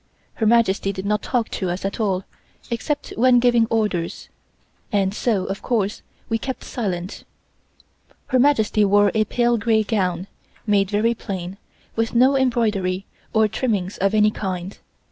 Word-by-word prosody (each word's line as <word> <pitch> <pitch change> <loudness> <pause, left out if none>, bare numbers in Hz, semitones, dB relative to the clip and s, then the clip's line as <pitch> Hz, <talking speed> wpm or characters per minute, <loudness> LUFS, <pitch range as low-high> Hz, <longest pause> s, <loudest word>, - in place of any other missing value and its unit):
Her 220 - 0
Majesty 210 -4 +3
did 190 0 -6
not 210 0 0
talk 240 -3 -1
to 185 - -3
us 180 +2 -3
at 195 - -3
all, 195 -4 0 0.5
except 290 +5 -3
when 250 +1 +5
giving 240 -2 +4
orders, 210 -7 -2 0.6
and 195 -2 +1
so, 210 -4 0
of 195 0 -4
course, 215 -5 -1 0.3
we 225 -1 -1
kept 260 +3 -5
silent. 190 -6 -4 1.1
Her 260 -2 +3
Majesty 225 -6 +3
wore 205 0 +4
a 215 -1 +2
pale 240 +1 +1
gray 220 +1 +2
gown, 185 -5 -1 0.4
made 200 -3 +2
very 215 +3 +2
plain, 190 -3 -6 0.4
with 225 +1 -1
no 260 +3 +5
embroidery 210 -8 0 0.3
or 220 -1 +3
trimmings 205 -4 -2
of 195 +2 +1
any 210 0 +4
kind. 185 -2 -5
210 Hz, 150 wpm, -22 LUFS, 195-235 Hz, 1.1 s, when